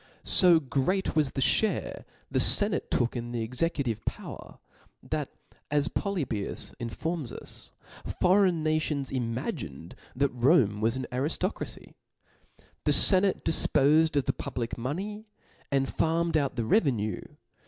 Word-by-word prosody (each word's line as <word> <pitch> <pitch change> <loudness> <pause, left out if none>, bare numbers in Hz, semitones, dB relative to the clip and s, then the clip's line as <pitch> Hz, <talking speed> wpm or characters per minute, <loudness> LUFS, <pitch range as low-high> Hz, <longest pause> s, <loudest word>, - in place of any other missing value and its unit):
So 175 -4 +6
great 160 +8 -1
was 150 -3 +2
th6 135 -1 +2
(hate 220 - -3 0.3
the - - +1
fenate 205 -2 +4
took 120 0 0
in 120 0 -5
the 115 -2 -2
exe 120 +3 -5
C)Book6.cmive 135 -10 -1
power, - - -7 0.5
that, - - -3 0.4
as 145 +2 +1
Poly 200 -5 -2
bias 105 -6 -4
(^) - - -21
informs 145 +4 -4
us^ - - -8 0.5
foreign 180 -3 +3
Nations 155 -3 -1
ifnaginfed 115 - -4 0.2
that 135 0 0
Rcmte 120 - +3
was 115 +2 0
an 130 0 -4
arifto 150 - -1
fcracy. - - -9 0.9
The - - +4
fenate 190 0 +6
difpofed 155 0 +3
ctf 145 -3 -1
the 135 - 0
public 120 -1 -5
money; 195 - -5 0.4
dnd 135 -1 +1
farmed 165 +1 0
out 140 -4 0
the 115 -3 -2
revenue! 115 - +1
140 Hz, 140 wpm, -27 LUFS, 120-170 Hz, 0.9 s, So